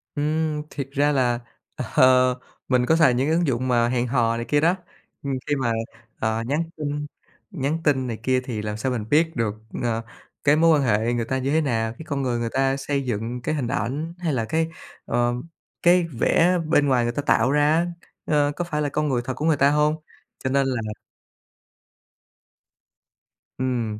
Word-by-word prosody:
Ừm, 155 +1 0
thiệt 140 -2 -5
ra 145 +1 +2
là, 125 -4 +1 0.4
ờ, 130 0 +4 0.3
mình 125 -1 +2
có 160 - +3
xài 155 -6 +5
những 130 +3 +1
cái 160 - +2
ứng 170 -1 +1
dụng 130 -1 0
mà 120 -1 +3
hẹn 125 0 0
hò 115 -2 +1
này 115 - -4
kia 145 - +2
đó, 170 +3 +3 0.5
ừm, 140 - -2
khi 145 - +1
mà, 130 -4 0 0.5
ờ, 110 +1 0
nhắn 145 +5 +1
tin 150 -1 -3 0.5
nhắn 150 -2 -1
tin 130 -4 +2
này 115 -2 -4
kia 130 0 +2
thì 115 -5 -4
làm 105 0 -4
sao 130 +4 -1
mình 115 -4 -3
biết 160 +2 +3
được, 110 -3 -1 0.3
ờ, 115 -1 0 0.4
cái 145 +1 +5
mối 160 -1 +5
quan - - +1
hệ 115 0 +1
người 120 -1 -1
ta 130 +3 -1
như 135 +2 -1
thế 160 - +3
nào? 115 -5 -1
Cái 160 - -9
con 140 -4 -2
người 125 -3 -1
người 115 -1 -2
ta 135 0 +1
xây 140 0 -1
dựng 120 +1 -3
cái 155 - -1
hình 130 -5 -2
ảnh, 140 +11 -2
hay 170 -4 -1
là 115 -4 0
cái, 160 +5 0 0.4
ờ, 120 0 +1 0.5
cái 175 +1 +5 0.2
vẻ 180 +2 +3
bên 145 -2 +3
ngoài 125 -3 +3
người 120 0 -1
ta 145 - -2
tạo 130 -3 +2
ra 150 +1 +3
á, 170 +1 +2 0.4
ờ, 145 -2 +2
có 175 - -2
phải 150 -3 -2
là 145 - 0
con 150 +1 -1
người 125 -2 +1
thật 130 - -2
của 150 +5 -4
người 160 -3 +3
ta 140 - +5
hông? 150 +1 +2 0.5
Cho 130 - 0
nên 135 0 +2
là 125 -3 -1 2.8
Ừm, 120 -5 -2
135 Hz, 205 wpm, -23 LUFS, 120-150 Hz, 2.8 s, xài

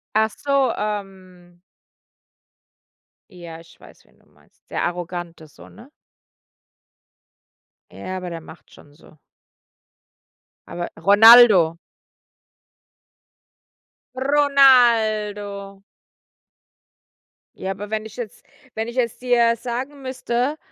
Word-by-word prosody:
Ach 220 0 +2
so, 275 -3 0
ähm 185 -4 -8 1.7
Ja, 170 -2 -11
ich 165 0 -21
weiß, - - -19
wen - - -30
du - - -30
meinst. - - -31
Der - - -3
arrogant 175 -1 -5
ist 155 -2 -17
so, - - -15
ne? 250 +5 -17 2.0
Ja, 185 - -8
aber 180 -1 -7
der 170 -1 -7
macht 160 - -16
schon 145 - -19
so. 155 0 -21 1.5
Aber 175 0 -6
Ronaldo. 200 -2 +6 2.4
Ronaldo. 225 -8 +2 1.7
Ja, 190 - -5
aber 200 +2 -8
wenn 220 0 -4
ich 220 0 -12
jetzt 235 -5 -9 0.3
wenn 220 +1 -4
ich 235 +2 -9
es 235 -3 -1
dir 240 -2 +1
sagen 255 +5 -6
müsste, 260 +2 -3
210 Hz, 100 wpm, -21 LUFS, 180-245 Hz, 2.4 s, Ronaldo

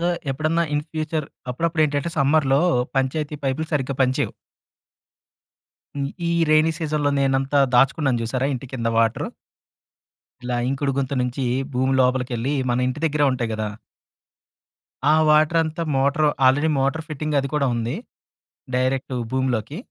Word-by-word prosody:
So, 170 - 0 0.2
ఎప్పుడన్నా 155 +5 0
in 145 0 -1
future 155 -1 -2 0.2
అప్పుడప్పుడు 160 +5 0
ఏంటంటే, 145 +2 -1
సమ్మర్‌‌లో 140 0 +3 0.4
పంచాయతీ 150 +3 -1
పైపులు 135 +4 -1
సరిగ్గా 135 -1 -1
పని 130 0 +2
చేయవు. - - -1 2.0
ఈ - - +1 0.2
రైనీ 155 +1 +4
సీజన్‌లో 150 -3 0
నేనంతా, 135 +1 +2 0.2
దాచుకున్నాను 135 -1 +3
చూసారా! 130 +3 -1
ఇంటి 130 0 -5
కింద 115 -2 -2
వాటరు. 115 -1 +1 1.2
ఇలా 125 -1 -1
ఇంకుడు 140 +1 -1
గుంత 135 0 -1
నుంచి, 125 +1 -2 0.3
భూమి 130 +1 +1
లోపలికెళ్ళి, 125 +1 0 0.2
మన 125 +1 +1
ఇంటి 130 +4 -3
దగ్గరే 150 -2 +2
ఉంటాయి 120 -3 -2
కదా! 110 -1 -2 1.4
ఆ 150 +2 +5
వాటర్ 155 +2 +4
అంతా, 160 +1 -4
మోటార్ 140 +3 +2 0.2
ఆల్రెడీ 145 +5 +4
మోటార్ 140 +4 0
ఫిట్టింగ్ 150 0 -2
అది 140 - -2
కూడా 140 -2 +2
ఉంది. 115 +4 -2 0.8
డైరెక్ట్ 130 +1 0 0.2
భూమిలోకి. 130 0 -1
135 Hz, 135 wpm, -22 LUFS, 130-155 Hz, 2.0 s, ఆ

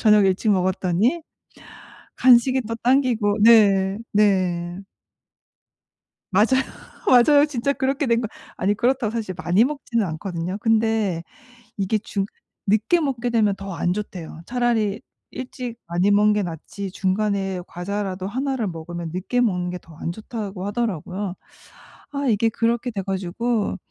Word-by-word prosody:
저녁 210 -3 +5
일찍 190 +3 +1
먹었더니 190 - +1 0.9
간식이 255 +1 +5
또 230 +1 -4
당기고 240 -5 +2
네. 200 -3 +5
네. 185 -4 +1 1.5
맞아요. 205 +3 +5 0.6
맞아요. 285 +4 +6
진짜 280 -1 -1
그렇게 270 +1 -1
된 235 0 +2
거 225 - -2 0.3
아니 200 +2 +1
그렇다고 240 0 +1
사실 220 -6 -4
많이 185 +5 +3
먹지는 250 -6 -1
않거든요. 175 +2 -4
근데 220 -6 +1 0.5
이게 200 +2 0
중 200 -1 -3 0.4
늦게 220 - +3
먹게 255 -5 -1
되면 215 -4 +2
더 195 0 -7
안 175 +2 0
좋대요. 180 -5 -6
차라리 235 -4 0 0.3
일찍 250 -2 -6
많이 175 +4 +1
먹는 210 +1 +5
게 210 - +1
낫지 185 +3 -6
중간에 195 -1 -1
과자라도 190 +1 -4
1 265 +6 -2
를 225 - -1
먹으면 170 0 -6
늦게 200 +7 -1
먹는 180 -6 0
게 180 - -5
더 165 -2 -17
안 170 - -4
좋다고 205 -2 -6
하더라고요. 200 -3 -3 0.8
아 280 0 -2
이게 225 0 +3
그렇게 235 +2 0
돼 200 -3 -4
가지고 195 +4 -1
210 Hz, 280 characters per minute, -23 LUFS, 185-235 Hz, 1.5 s, 맞아요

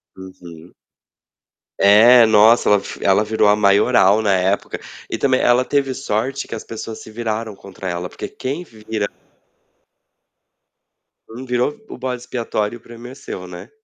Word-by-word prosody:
Uhum. 90 -3 -13 1.1
É, 115 +5 +7
nossa, 110 +2 +5
ela 105 - +5
f - - -9
ela 100 +2 +3
virou 110 0 +1
a 105 - +5
maioral 105 0 +3
na 100 -2 +1
época 95 +2 -1 0.3
e - - -3
também, 130 -2 +1
ela 125 +1 +3
teve 135 -2 0
sorte 130 +7 -3
que - - -8
as 110 - -6
pessoas 115 0 -8
se - - -12
viraram 110 -1 -4
contra 95 -1 -8
ela, 85 0 -4
porque - - -8
quem 140 +7 -5
vira 110 -6 -5 2.2
Hum, 120 +4 -9
virou 125 +3 -1
o - - -8
bode 125 -1 -4
expiatório, 120 -3 -3
o - - -29
prêmio 120 +1 -12
é 130 - -12
seu, 90 -8 -8
né. 90 +3 -10
110 Hz, 155 wpm, -19 LUFS, 100-125 Hz, 2.2 s, É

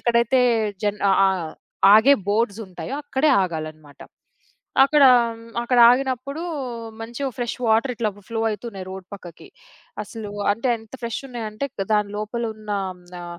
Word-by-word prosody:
ఎక్కడైతే 235 +2 +2 0.4
జన్ 205 0 -1
ఆహ్, 190 -3 +2 0.5
ఆగే 240 +6 +7 0.2
బోర్డ్స్ 220 0 0
ఉంటాయో 180 +7 -6
అక్కడే 290 +1 +1
ఆగాలన్నమాట. 155 -4 -6 0.8
అక్కడ 280 +1 +5 0.6
అక్కడ 245 +1 +1
ఆగినప్పుడు 265 +4 -1 0.6
మంచిగా 235 +5 -4
ఫ్రెష్ 240 -2 -3
వాటర్ 225 +4 +2
ఇట్లా 230 -2 -1 0.2
ఫ్లో 225 -1 -3
అయితున్నాయి 205 -3 -6
రోడ్ 190 -1 -8
పక్కకి. 175 -4 -12 0.5
అసలు 210 0 -8 0.2
అంటే 230 +5 -2
ఎంత 225 +1 -18
ఫ్రెష్ 230 -1 -3
ఉన్నాయంటే 235 0 -5
క్ - - -3
దాని 210 -1 +1
లోపల 215 +3 -4
ఉన్న 215 -1 -16 0.3
హ్మ్. - - -21 0.2
ఆహ్, 175 0 -8
220 Hz, 135 wpm, -22 LUFS, 195-245 Hz, 0.8 s, ఆగే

